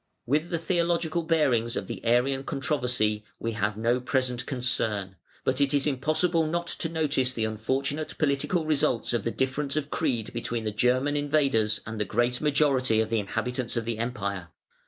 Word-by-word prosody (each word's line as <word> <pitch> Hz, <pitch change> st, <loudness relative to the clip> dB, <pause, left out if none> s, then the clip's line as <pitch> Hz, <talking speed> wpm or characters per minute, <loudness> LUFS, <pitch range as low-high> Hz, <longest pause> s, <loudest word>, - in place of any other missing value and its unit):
With 150 Hz, +6 st, +1 dB
the 170 Hz, -, 0 dB
theological 170 Hz, -1 st, 0 dB
bearings 140 Hz, -8 st, +2 dB
of 100 Hz, -, -2 dB
the -, -, -7 dB
Arian 125 Hz, +3 st, +2 dB
controversy 125 Hz, -7 st, 0 dB, 0.2 s
we 115 Hz, -, -2 dB
have 105 Hz, -1 st, -1 dB
no 120 Hz, +3 st, +2 dB
present 125 Hz, -1 st, -1 dB
concern; 110 Hz, -7 st, -1 dB, 0.3 s
but 130 Hz, +2 st, +1 dB
it 140 Hz, 0 st, +3 dB
is 140 Hz, -, +3 dB
impossible 155 Hz, +4 st, +2 dB
not 170 Hz, +2 st, -1 dB
to 165 Hz, -, -2 dB
notice 145 Hz, -5 st, +1 dB
the 115 Hz, -3 st, -1 dB
unfortunate 135 Hz, +8 st, -2 dB
political 155 Hz, +3 st, +1 dB
results 140 Hz, -6 st, +1 dB
of 120 Hz, -, -1 dB
the -, -, +2 dB
difference 135 Hz, +3 st, -1 dB
of 150 Hz, -1 st, -2 dB
creed 125 Hz, -9 st, -1 dB
between 120 Hz, -1 st, -3 dB
the 110 Hz, -, -1 dB
German 125 Hz, +6 st, +2 dB
invaders 140 Hz, -8 st, +2 dB
and 110 Hz, -1 st, -4 dB
the -, -, +1 dB
great 120 Hz, +3 st, 0 dB
majority 140 Hz, -6 st, +3 dB
of 110 Hz, 0 st, 0 dB
the 115 Hz, -, +2 dB
inhabitants 125 Hz, +4 st, -3 dB
of 115 Hz, -, -1 dB
the 115 Hz, -1 st, -3 dB
Empire. 100 Hz, -6 st, -3 dB
130 Hz, 175 wpm, -27 LUFS, 115-150 Hz, 0.3 s, it